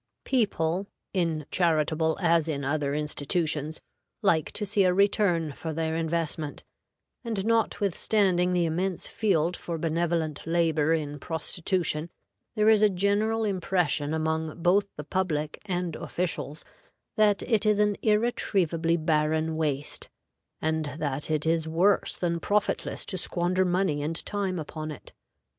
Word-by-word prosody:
People, 195 -7 0 0.3
in 165 -5 0
charitable 160 -2 +2
as 165 -1 +3
in 140 -3 -2
other 145 0 0
institutions, 150 +1 -1 0.4
like 160 -6 +2
to 210 - -3
see 200 0 +2
a 180 -1 +3
return 185 -5 +2
for 160 +3 -5
their 160 0 -1
investment; 160 -2 -2 0.6
and, 220 -5 -2
notwithstanding 200 -4 +2
the 175 -1 +2
immense 175 +3 -1
field 180 -5 +1
for 170 -1 -5
benevolent 165 -1 -1
labor 165 -2 +2
in 145 -2 -4
prostitution, 165 0 -2 0.5
there 215 -1 +2
is 220 -1 +6
a 215 - +6
general 205 +4 +1
impression 180 -7 0
among 160 +1 -2
both 200 +3 +4
the 150 - -6
public 155 -2 -2
and 180 -3 -2
officials 165 -4 -3 0.5
that 210 -2 +3
it 220 -4 +2
is 210 -1 +4
an 210 -1 +3
irretrievably 190 -7 +1
barren 155 0 +1
waste, 145 -3 -2 0.5
and 160 -2 -1
that 145 -2 -2
it 155 -1 0
is 160 0 +1
worse 180 +5 +2
than 170 -1 -1
profitless 205 +5 -1
to 185 - -3
squander 180 +2 0
money 180 -4 +1
and 160 +3 -1
time 195 -3 -2
upon 155 0 -5
it. 150 - -10
165 Hz, 135 wpm, -27 LUFS, 155-190 Hz, 0.6 s, is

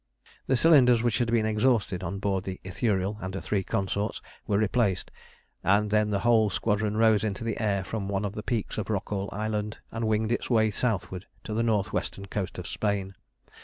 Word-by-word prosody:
The 130 - +3
cylinders, 125 -6 +6
which 115 -2 +1
had 120 -2 +1
been 115 -2 +3
exhausted 110 -4 +1
on 90 +3 -3
board 95 -2 -1
the 95 -1 -5
Ithuriel 100 +1 -1
and 95 0 -5
her - - -2
three 100 -1 -1
consorts, 100 +2 -2 0.3
were 100 - +2
replaced, 105 -3 +1 0.5
and 105 +2 +3
then 105 0 +3
the 100 -2 0
whole 115 -3 +4
squadron 105 +1 0
rose 110 -2 +4
into 105 0 -2
the 115 -2 -2
air 100 -3 +1
from 100 +1 -4
one 100 +1 -1
of 100 - -3
the 105 - -5
peaks 110 0 -2
of - - -3
Rockall 100 -1 -2
Island 105 0 -2
and 115 0 -2
winged 110 +1 +1
its 120 - -1
way 110 -3 +3
southward 100 -4 -2 0.2
to 110 - -5
the 110 - +1
north 110 -3 +1
western 100 - -3
coast 95 -1 -4
of 90 - -6
Spain. 100 -1 -2
105 Hz, 200 wpm, -27 LUFS, 100-110 Hz, 0.5 s, cylinders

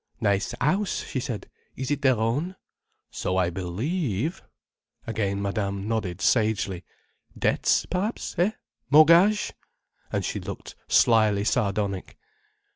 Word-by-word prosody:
"Nice 100 +1 0
house!" 190 +9 0
she 130 - -4
said. 120 -4 -5 0.3
"Is 130 +1 -4
it 145 -1 0
their 130 -3 +4
own?" 135 - -1 0.6
"So 95 - -2
I 90 -2 +2
believe—" 115 - -2 0.6
Again 100 -3 -1
Madame 100 0 -2
nodded 100 -5 -2
sagely. 105 -5 +1 0.5
"Debts - - +2
perhaps—eh? 190 0 -1 0.4
Mortgage—" 170 +8 +6 0.6
and - - -1
she - - -2
looked - - -8
slyly 110 -3 +4
sardonic. 100 -3 -1
110 Hz, 110 wpm, -26 LUFS, 100-150 Hz, 0.6 s, Mortgage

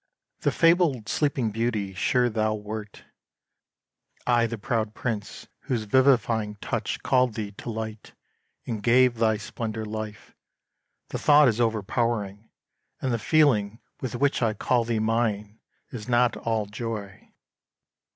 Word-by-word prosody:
The - - +1
fabled 165 -9 +3
Sleeping 135 -6 0
Beauty 110 -3 -1
sure 125 +6 +2
thou 110 -1 0
wert! 105 0 -7 1.2
I 120 -1 +3
the 115 0 -5
proud 110 -1 -2
Prince 110 -5 -4 0.2
whose 120 -4 -1
vivifying 115 -3 +2
touch 105 - -3
Called 125 -3 +2
thee 105 -2 -4
to 100 - -9
light 110 -1 -6 0.5
and 110 -3 -4
gave 120 +1 +4
thy 110 -1 +3
splendour 110 +1 -5
life; 110 0 -7 0.8
The - - -4
thought 150 -1 +6
is 120 0 +1
overpowering; 110 -1 -1 0.5
and 130 -2 -1
the 115 - 0
feeling 115 -6 +2 0.2
With 130 -1 -4
which 140 +2 +1
I 110 -3 +1
call 120 +2 +1
thee 115 -1 -1
mine 110 -1 -1 0.3
is 115 -1 -7
not 120 0 +3
all 110 -2 -1
joy. 105 -2 -6
115 Hz, 130 wpm, -26 LUFS, 105-120 Hz, 1.2 s, thought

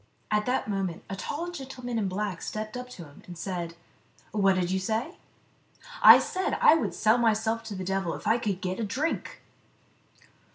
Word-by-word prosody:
At 210 +1 +1
that 250 -2 0
moment 195 -5 -2
a - - -2
tall 325 - -4
gentleman 260 -6 -5
in 205 - 0
black 190 -1 -3
stepped 215 +1 -5
up 250 0 -6
to 190 -8 -9
him, 145 -1 -16
and 175 -1 -9
said, 170 -2 -4 0.3
" - - -31
What 195 -2 +3
did 180 -1 0
you 190 - +1
say 225 - -2 0.2
?" - - -37
" - - -14
I - - +11
said 375 +1 -1
I - - +7
would 325 - 0
sell 220 +3 +3
myself 225 0 +1
to 215 -2 -6
the 185 - -4
devil 190 -2 -1
if - - -10
I 225 +3 +3
could 200 -5 -2
get 185 0 -3
a - - -1
drink." 275 +10 -3
215 Hz, 205 wpm, -28 LUFS, 190-245 Hz, 0.3 s, I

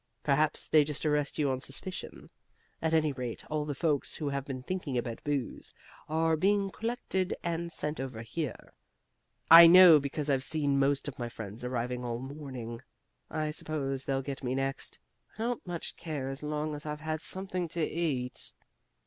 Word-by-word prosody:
Perhaps 150 +1 +2
they 155 -1 +6
just 150 +1 -3
arrest 150 -1 +1
you 145 -3 +2
on 130 0 -2
suspicion. 165 +8 -1 0.5
At 160 0 +1
any 155 -2 +3
rate 125 -4 -5
all 150 -1 0
the 145 -1 -3
folks 150 -1 0
who 150 -3 -2
have 140 -1 -3
been 130 -2 -5
thinking 160 -6 -3
about 120 -1 -4
booze 145 -4 -3 0.3
are 160 +1 +2
being 195 +4 +2
collected 200 -3 -2
and 170 0 -2
sent 150 -3 -3
over 130 -4 -5
here. 140 +3 -5 0.8
I 165 +1 +12
know 175 -2 +9
because 140 +1 -3
I've 135 -2 +1
seen 145 -2 +1
most 140 +1 +2
of 140 - -6
my 120 -1 -3
friends 110 0 -7
arriving 125 0 -2
all 120 -1 -2
morning. 130 -3 -7 0.5
I 155 -1 -2
suppose 135 -4 -3
they'll 135 -1 -1
get 135 0 -6
me 125 0 -1
next. 135 0 -3 0.4
I 220 - -4
don't 240 -4 -2
much 175 -2 -5
care 145 -5 -4
as 135 +1 -4
long 150 0 -2
as 150 +1 -7
I've 150 0 -4
had 155 0 -3
something 185 -2 -1
to 165 0 -2
eat." 145 -8 -2
150 Hz, 175 wpm, -30 LUFS, 135-160 Hz, 0.8 s, I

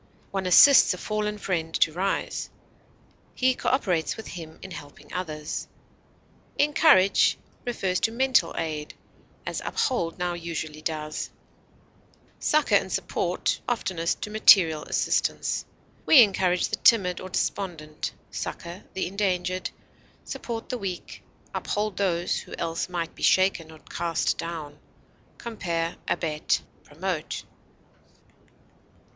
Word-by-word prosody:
One 195 -1 -2
assists 230 +3 +8
a - - -10
fallen 210 +1 -2
friend 165 -5 -2
to 155 - +3
rise; 190 +3 -2 0.9
he 260 0 +3
cooperates 190 - 0
with 220 - -8
him 160 -2 -8
in 190 - -8
helping 145 -4 -11
others. 155 -4 -4 0.9
Encourage 290 - +5 0.3
refers 190 -6 0
to 225 - +1
mental 245 -7 +3
aid, 155 -2 -3 0.5
as - - -3
uphold 170 - -1
now 180 -1 -1
usually 165 -3 -5
does; 155 -1 -3 1.1
succor 305 0 +2
and - - +3
support, - - -1
oftenest 185 -8 -1
to 210 - -5
material 180 -7 +6
assistance. - - 0 0.4
We 270 -6 +10
encourage 185 -3 +1
the - - -2
timid 185 -6 +4
or 185 - -7
despondent, 165 -5 -3 0.2
succor 170 +3 -6
the 190 - -1
endangered, 185 -1 -1 0.6
support 230 -1 -5
the 250 - -3
weak, 185 -4 -6 0.3
uphold 210 -2 -2
those 175 -3 0
who - - -9
else 165 +2 -2
might 170 -2 -3
be - - -15
shaken 185 -4 +3
or 160 - -12
cast 165 +1 -2
down. 155 -3 -6 0.6
Compare 170 -7 -3
ABET; 155 -3 0 0.2
PROMOTE. 160 +1 -4
180 Hz, 115 wpm, -26 LUFS, 165-205 Hz, 1.1 s, We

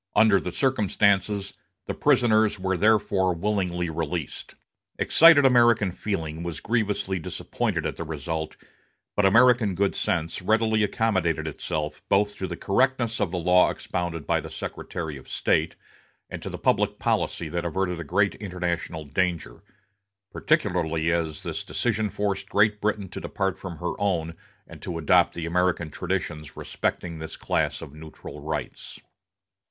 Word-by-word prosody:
Under 105 -3 +5
the 90 - -5
circumstances, 100 -4 +1 0.3
the - - -3
prisoners 110 -7 +3
were 95 0 0
therefore 100 -2 +2
willingly 90 -2 -1
released. 80 -1 -4 0.4
Excited 160 -3 +6
American 120 -6 +5
feeling 80 -5 -4
was 85 -2 -5
grievously 105 -4 -1
disappointed 80 - -3
at - - -3
the - - -4
result; 80 0 -4 0.6
but 100 -1 +4
American 120 -2 +5
good 100 +2 +1
sense 80 +3 -2
readily 110 +2 +2
accommodated 95 -8 0
itself 75 0 -4
both 105 +1 +2
to 95 - -3
the 85 -1 -6
correctness 120 +1 +1
of - - +1
the 90 - -3
law 90 +1 +4
expounded 85 -4 -4
by - - +1
the - - -8
Secretary 80 -4 -5
of 65 - -14
State, 80 +1 +1 0.6
and - - -6
to - - -5
the - - -6
public - - +1
policy 85 - -1
that 85 +2 -3
averted 90 0 -1
a - - -4
great 100 +6 +1
international 90 -5 -4
danger; 85 -4 -2 0.7
particularly 80 0 +1
as 80 -2 -2
this - - -4
decision 110 -3 -1
forced 100 -1 -2
Great 105 0 +2
Britain 105 -2 -1
to 90 - -7
depart 95 -2 -2
from 90 -4 -7
her 90 - -3
own 85 -5 0 0.3
and - - -13
to 85 - -4
adopt 85 +2 +3
the 85 - -4
American 85 -2 0
traditions 75 0 -4
respecting 85 -2 -3
this 80 0 -7
class - - -1
of 70 - -10
neutral 80 0 -10
rights. - - -5
90 Hz, 145 wpm, -25 LUFS, 85-105 Hz, 0.7 s, Excited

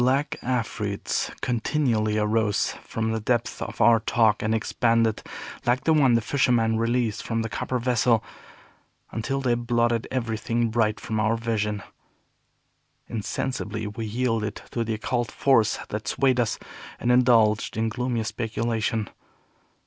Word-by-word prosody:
Black 140 +5 +1
afreets 115 -5 -2
continually 115 -3 0
arose 105 -1 +1
from 110 0 -2
the 110 - -1
depths 120 +2 -1
of - - -6
our 115 -1 +6
talk, 110 -1 +2
and 110 +1 +1
expanded, 115 0 +1 0.4
like 125 +3 +1
the 160 - +3
one 135 -6 +5
the 115 - +3
fisherman 115 -2 +2
released 115 -1 0
from 115 -1 -2
the 115 - -3
copper 125 +4 -2
vessel, 120 -2 +2 0.9
until 135 +5 -2
they 125 -2 +2
blotted 120 -1 +1
everything 115 -1 -1
bright 110 -2 +1
from 110 -1 -3
our 110 +2 +2
vision. 105 -3 -2 1.3
Insensibly, 110 0 -3
we 110 +2 -5
yielded 115 -2 -1 0.2
to 115 - -1
the 110 -1 -2
occult 120 +1 -2
force 115 -6 +3
that 105 +1 -4
swayed 130 -2 +2
us, 115 -3 +1 0.4
and 120 - +1
indulged 115 -5 +4
in 110 0 +1
gloomy 120 0 -1
speculation. 110 0 -2
115 Hz, 135 wpm, -25 LUFS, 110-120 Hz, 1.3 s, our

